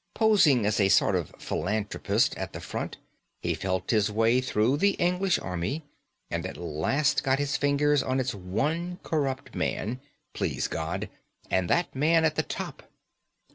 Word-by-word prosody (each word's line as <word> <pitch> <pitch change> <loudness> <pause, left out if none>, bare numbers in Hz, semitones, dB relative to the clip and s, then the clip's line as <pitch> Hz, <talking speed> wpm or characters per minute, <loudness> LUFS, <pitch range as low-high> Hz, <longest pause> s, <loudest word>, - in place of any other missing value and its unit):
Posing 185 - +4
as 105 +1 +1
a 100 -1 +4
sort 100 0 +4
of 85 -5 -2
philanthropist 105 -1 0
at - - -5
the - - -6
front, - - -5 0.4
he - - -1
felt 95 -1 -2
his 110 -2 +3
way 115 +4 +3
through 125 +1 +1
the 200 +5 +3
English 180 +1 +1
Army, 90 - -3 0.5
and 85 0 -2
at 95 - -6
last 85 - +1
got 135 -2 +2
his 145 0 -1
fingers 145 0 +2
on 130 0 0
its 130 +1 -1
one 150 - -2
corrupt 140 -4 -2
man 120 +4 -2 0.3
please - - -1
God! 80 0 -3 0.4
and 95 -2 +1
that 175 - +1
man 160 +4 +3
at 155 - +2
the - - +1
top. - - -6
130 Hz, 160 wpm, -27 LUFS, 100-155 Hz, 0.5 s, Posing